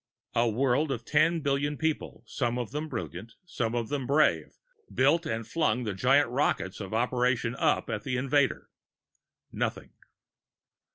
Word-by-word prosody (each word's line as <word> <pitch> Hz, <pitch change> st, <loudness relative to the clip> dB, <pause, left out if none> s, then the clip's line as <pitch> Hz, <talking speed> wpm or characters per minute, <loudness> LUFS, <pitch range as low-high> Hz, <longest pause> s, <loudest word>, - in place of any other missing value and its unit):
A 115 Hz, 0 st, +2 dB
world 135 Hz, +6 st, +1 dB
of 120 Hz, -3 st, -3 dB
ten 160 Hz, +2 st, +2 dB
billion 140 Hz, +1 st, 0 dB
people, 160 Hz, -1 st, -2 dB
some 120 Hz, +1 st, -2 dB
of 120 Hz, -2 st, -4 dB
them 150 Hz, +2 st, -4 dB
brilliant, 90 Hz, -, -6 dB, 0.3 s
many 115 Hz, 0 st, 0 dB
of 115 Hz, -2 st, -2 dB
them 140 Hz, -4 st, -2 dB
brave, 150 Hz, +2 st, +2 dB, 0.3 s
built 155 Hz, +5 st, +2 dB
and 115 Hz, -5 st, -3 dB
flung 125 Hz, -7 st, 0 dB
the 105 Hz, -3 st, -2 dB
giant 125 Hz, +6 st, +3 dB
rockets 125 Hz, -8 st, 0 dB
of 95 Hz, -3 st, -6 dB
Operation 125 Hz, +1 st, +1 dB
Up -, -, +1 dB
at -, -, -3 dB
the 130 Hz, -3 st, -2 dB
invader: 135 Hz, +1 st, +1 dB, 0.8 s
Nothing. -, -, -3 dB
125 Hz, 150 wpm, -28 LUFS, 115-145 Hz, 0.8 s, giant